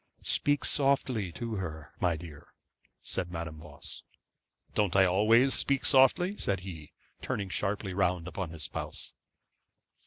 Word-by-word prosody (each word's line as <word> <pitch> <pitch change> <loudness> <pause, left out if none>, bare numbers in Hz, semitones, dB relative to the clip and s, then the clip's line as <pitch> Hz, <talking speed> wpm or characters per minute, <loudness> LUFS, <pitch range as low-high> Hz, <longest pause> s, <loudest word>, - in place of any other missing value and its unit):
'Speak 145 0 +2
softly 130 - +2
to 115 +3 -4
her, 80 -6 -6
my 85 -2 +2
dear,' 80 -3 -11 0.6
said 85 - -2
Madame 80 -2 -5
Voss. 75 -2 -9 0.7
'Don't 100 -4 +1
I 95 0 +6
always 110 +8 +4
speak 140 -1 0
softly?' 175 +9 +4
said 95 -2 -1
he, 85 -5 -9 0.3
turning 100 -2 -3
sharply 100 0 -1
round 90 -2 0
upon 90 -1 -4
his 80 -1 -5
spouse. - - -5
95 Hz, 130 wpm, -30 LUFS, 85-115 Hz, 0.7 s, I